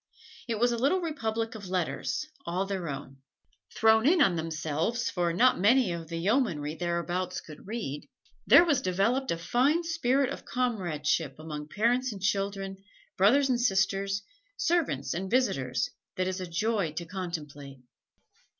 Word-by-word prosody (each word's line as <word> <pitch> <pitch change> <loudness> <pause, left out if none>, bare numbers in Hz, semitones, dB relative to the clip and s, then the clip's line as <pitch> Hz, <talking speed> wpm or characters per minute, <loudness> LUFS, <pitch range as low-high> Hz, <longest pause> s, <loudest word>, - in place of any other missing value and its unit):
It 230 -2 -1
was 240 +1 +3
a 235 - -1
little 285 +9 +2
republic 230 -9 -2
of 205 -4 -8
letters 185 - -2 0.2
all 180 +3 -1
their 190 -4 -3
own. 135 -1 -7 0.6
Thrown 220 +2 +4
in 350 +3 +5
on 195 -12 +4
themselves 160 +8 -2
for 175 -2 0
not 245 +8 +4
many 225 +1 +4
of 170 -1 -5
the 165 +1 -5
yeomanry 170 - 0
thereabouts 175 +2 -2
could 155 +3 -13
read, 210 - -5 0.4
there 345 - +8
was 295 -6 +2
developed 200 +9 +1
a 170 - 0
fine 265 - +2
spirit 280 -5 +1
of - - -6
comradeship 170 - -1
among 150 -1 -7
parents 240 +7 +1
and 205 - -7
children, 195 0 -1 0.4
brothers 260 +9 +4
and 245 -1 +1
sisters, 195 -2 +1 0.3
servants 325 - 0
and 190 +3 -3
visitors, 135 - 0 0.2
that 185 0 0
is 185 0 -3
a 185 - -4
joy 195 -1 0
to 170 +2 -5
contemplate. 150 -6 -6
195 Hz, 150 wpm, -29 LUFS, 165-240 Hz, 0.6 s, there